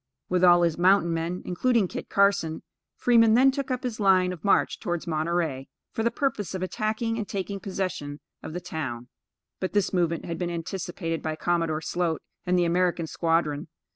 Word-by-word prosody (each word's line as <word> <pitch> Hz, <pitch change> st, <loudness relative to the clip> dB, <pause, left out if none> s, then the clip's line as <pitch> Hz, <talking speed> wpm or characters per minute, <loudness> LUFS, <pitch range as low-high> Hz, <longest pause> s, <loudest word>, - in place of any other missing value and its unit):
With 180 Hz, 0 st, +1 dB
all 175 Hz, -1 st, +7 dB
his 170 Hz, -1 st, +1 dB
mountain 180 Hz, -2 st, +4 dB
men, 165 Hz, +2 st, -3 dB
including 225 Hz, +2 st, +2 dB
Kit -, -, -7 dB
Carson, 200 Hz, -5 st, +2 dB, 0.3 s
Fremont 230 Hz, -2 st, +5 dB
then 265 Hz, +3 st, +6 dB
took 275 Hz, 0 st, -4 dB
up 255 Hz, -1 st, -2 dB
his 240 Hz, -3 st, -3 dB
line 185 Hz, -2 st, +4 dB
of 170 Hz, -, -11 dB
march 200 Hz, -, +2 dB
towards 175 Hz, -4 st, -3 dB
Monterey, 160 Hz, -4 st, -1 dB, 0.2 s
for -, -, -3 dB
the 230 Hz, -, +2 dB
purpose 230 Hz, -, -2 dB
of 185 Hz, -, -3 dB
attacking 220 Hz, +4 st, -2 dB
and 210 Hz, -, -3 dB
taking 200 Hz, 0 st, -4 dB
possession 185 Hz, -7 st, -4 dB, 0.2 s
of -, -, -7 dB
the 180 Hz, -, -4 dB
town; 125 Hz, -8 st, -5 dB, 0.5 s
but, 185 Hz, -, -3 dB
this 205 Hz, -1 st, +1 dB
movement 170 Hz, -2 st, 0 dB
had 165 Hz, -1 st, -4 dB
been 175 Hz, -, -1 dB
anticipated 170 Hz, -1 st, -4 dB
by 155 Hz, -1 st, -2 dB
Commodore 165 Hz, -2 st, 0 dB
Sloat 170 Hz, -2 st, -1 dB, 0.2 s
and 180 Hz, 0 st, +3 dB
the 175 Hz, -, +3 dB
American 175 Hz, 0 st, +1 dB
squadron. 160 Hz, -3 st, 0 dB
180 Hz, 180 wpm, -26 LUFS, 165-200 Hz, 0.5 s, all